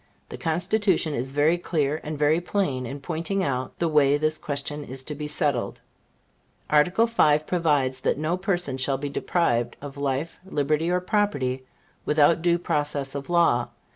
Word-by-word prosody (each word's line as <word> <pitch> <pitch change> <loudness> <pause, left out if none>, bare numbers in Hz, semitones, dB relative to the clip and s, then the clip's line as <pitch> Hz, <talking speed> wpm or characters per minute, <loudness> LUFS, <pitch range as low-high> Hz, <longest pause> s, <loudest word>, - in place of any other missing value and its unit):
The - - -7
Constitution 180 0 +1
is 130 0 -3
very 150 +5 +2
clear 155 -3 -1
and 155 0 -5
very 150 +3 +2
plain 145 -10 -1
in 140 +3 -7
pointing 170 +5 -2
out 130 -4 -3
the 170 - 0
way 145 -2 +4
this 155 +1 0
question 145 +1 -3
is 130 -1 -6
to 150 - -5
be 150 0 -5
settled. 145 -4 0 0.9
Article 180 +9 +4
V. 155 -11 +4
provides 145 -7 +1
that - - 0
no 155 +4 0
person 180 -7 -1
shall 135 +1 +1
be 145 +1 -4
deprived 130 -6 0
of 145 0 -9
life, 140 +3 -2
liberty 155 -2 0
or 180 0 +1
property 145 - -1 0.4
without 150 +2 +3
due 170 0 +3
process 145 -5 -1
of 140 +1 -6
law. 170 -9 +3
150 Hz, 165 wpm, -25 LUFS, 140-170 Hz, 0.9 s, way